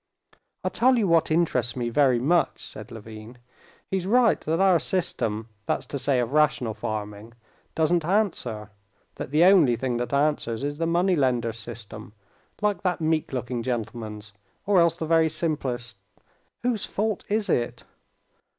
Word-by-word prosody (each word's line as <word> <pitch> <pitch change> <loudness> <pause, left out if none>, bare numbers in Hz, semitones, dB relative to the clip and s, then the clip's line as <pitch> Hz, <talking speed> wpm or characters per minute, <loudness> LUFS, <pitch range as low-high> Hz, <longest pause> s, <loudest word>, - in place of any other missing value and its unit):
"I'll - - -1
tell 255 +2 +3
you 215 -4 +2
what 165 -2 +3
interests 155 -8 +1
me 120 -2 -2
very 130 0 +3
much," 165 +8 +1
said - - -9
Levin. 110 +1 -10 0.5
"He's 190 -1 -2
right 240 +1 +4
that 160 +2 -1
our 190 -3 +5
system, 115 - -2 0.2
that's - - -1
to 140 - -5
say 135 -1 +1
of 120 +2 -2
rational 150 -6 +2
farming, 105 0 -5 0.4
doesn't 165 +1 +2
answer, 155 - -1 0.5
that - - -5
the 155 +4 +4
only 175 -10 +6
thing 125 0 -2
that 120 0 -3
answers 140 -4 0
is 145 +1 -3
the 165 - 0
money 175 +2 +2
lender 125 -6 +1
system, 110 -2 -9 0.5
like 205 -4 +1
that 180 -2 0
meek 160 -1 0
looking 125 -2 -3
gentleman's, 110 -3 -5 0.3
or 200 -2 +4
else 170 0 +3
the 160 - -3
very 160 0 +3
simplest.... 130 -9 -3 0.6
Whose 240 -4 0
fault 215 -1 -2
is 210 0 0
it?" 120 -1 -1
145 Hz, 155 wpm, -25 LUFS, 115-175 Hz, 0.6 s, only